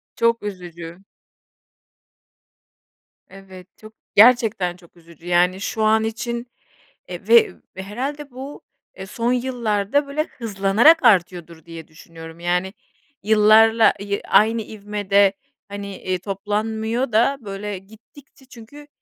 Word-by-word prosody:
Çok 230 -1 +1
üzücü. 175 -3 -8 2.3
Evet, 190 -2 -14
çok 215 0 -15 0.2
gerçekten 215 -5 +4
çok 175 -1 -22
üzücü. 170 0 -17
Yani, 180 +2 +1
şu 220 +2 -3
an 220 +1 +3
için, 235 +2 -4 0.6
eee, - - -9
ve 450 -3 +5 0.2
herhâlde 265 +9 -6
bu, 265 +3 -9 0.4
eee, 190 - -7
son 230 +5 -2
yıllarda 245 +1 -1
böyle 290 +2 -2
hızlanarak 225 +6 +2
artıyordur 175 -6 +1
diye 165 -2 -11
düşünüyorum. 165 +1 -13
Yani, 180 +2 -2 0.5
yıllarla, 220 +1 +5
ııı, 200 0 -3
aynı 225 +1 +3
ivmede 205 -2 0 0.3
hani, 200 0 -7
eee, 185 -1 -3
toplanmıyor 220 +5 -3
da 240 +6 +2
böyle 200 -1 -6
gittikçe 225 +8 -19
çünkü 265 +4 -14
210 Hz, 110 wpm, -21 LUFS, 190-235 Hz, 2.3 s, ve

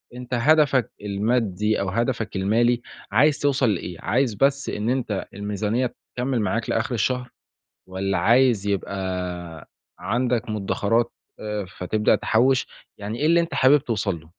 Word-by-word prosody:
أنت 125 0 -7
هدفك 135 -1 +3
المادي 105 0 0
أو 100 - -1
هدفك 115 0 -2
المالي 115 +5 +2 0.3
عايز 150 0 +4
توصل 135 -4 +2
لإيه، 90 -3 -3
عايز 125 +1 +1
بس 140 +4 +1
إن 105 +2 -2
أنت 120 -6 -1
الميزانية 105 +4 -2 0.2
تكمِّل 125 -2 -1
معاك 115 +3 -1
لآخر 115 +3 -1
الشهر 125 +3 -1 0.6
والّا 95 +1 -2
عايز 120 -4 +3
يبقى 90 -4 -4 0.3
عندك 120 -1 -1
مدخرات 110 +2 0 0.3
آآ 105 -2 -4
فتبدأ 105 +4 +2
تحوّش، 130 +3 +2 0.3
يعني 105 +3 -5
إيه 150 - +1
اللي 170 +2 +5
أنت 170 - -3
حابب 135 +3 +5
توصل 105 - -2
له؟ 80 - -18
115 Hz, 140 wpm, -23 LUFS, 100-125 Hz, 0.6 s, اللي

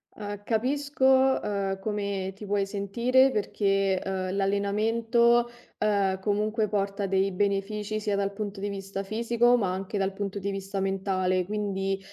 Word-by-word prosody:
Uhm, 205 -1 -6
capisco, 265 +6 -1 0.4
uhm, 195 -2 -2
come 200 -2 -3
ti 210 - -9
puoi 200 -1 0
sentire 235 +7 +2
perché, 195 -3 +1
uhm, 190 -1 -2
l'allenamento, 225 +4 +2 0.3
uhm, 200 -3 +1
comunque 215 +2 0
porta 200 0 -1
dei 195 +1 +1
benefici, 205 +2 -1
sia 210 -1 -1
dal 200 0 0
punto 200 0 -5
di 205 +1 -2
vista 195 0 -5
fisico, 235 +4 +2
ma 195 -6 0
anche 190 +2 -4
dal 195 0 0
punto 200 0 -4
di 200 0 -2
vista 195 0 -4
mentale 185 -1 0
quindi, 195 -1 -2
200 Hz, 145 wpm, -27 LUFS, 195-215 Hz, 0.4 s, sentire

